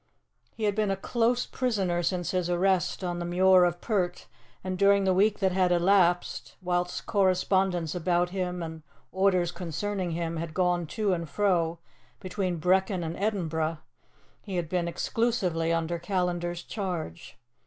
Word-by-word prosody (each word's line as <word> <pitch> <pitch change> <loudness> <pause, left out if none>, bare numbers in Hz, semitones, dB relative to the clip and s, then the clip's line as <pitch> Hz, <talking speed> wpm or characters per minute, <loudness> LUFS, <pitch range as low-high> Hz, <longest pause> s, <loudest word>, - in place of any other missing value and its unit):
He 225 - -6
had 205 -1 +2
been 210 0 0
a 195 - 0
close 240 +4 +1
prisoner 195 -9 -1
since 175 0 -1
his 180 -2 -1
arrest 185 0 +1
on 175 -1 -2
the - - -3
Muir 180 +1 +5
of 175 0 -1
Pert, 180 -6 -1 0.4
and 185 0 -3
during 200 +1 +4
the 190 -1 +3
week 205 +3 +3
that 190 -2 +1
had 180 -1 +2
elapsed, 175 0 +2
whilst 180 -1 -2
correspondence 185 -4 +1
about 175 0 +1
him 180 -2 -3
and 160 -1 -7 0.3
orders 185 -2 +2
concerning 180 +2 -3
him 165 0 -3
had 160 -1 -5
gone 180 -2 +1
to 210 +2 0
and 170 -3 -3
fro 170 -1 +1 0.4
between 185 -2 -2
Brechin 185 +2 +2
and 165 +1 -4
Edinburgh, 165 -6 -1 0.6
he 195 -3 -6
had 170 -3 -2
been 175 -1 0
exclusively 180 -4 0
under 165 +1 -1
Callandar's 175 -1 -2
charge. 175 - -5
180 Hz, 155 wpm, -28 LUFS, 175-195 Hz, 0.6 s, Muir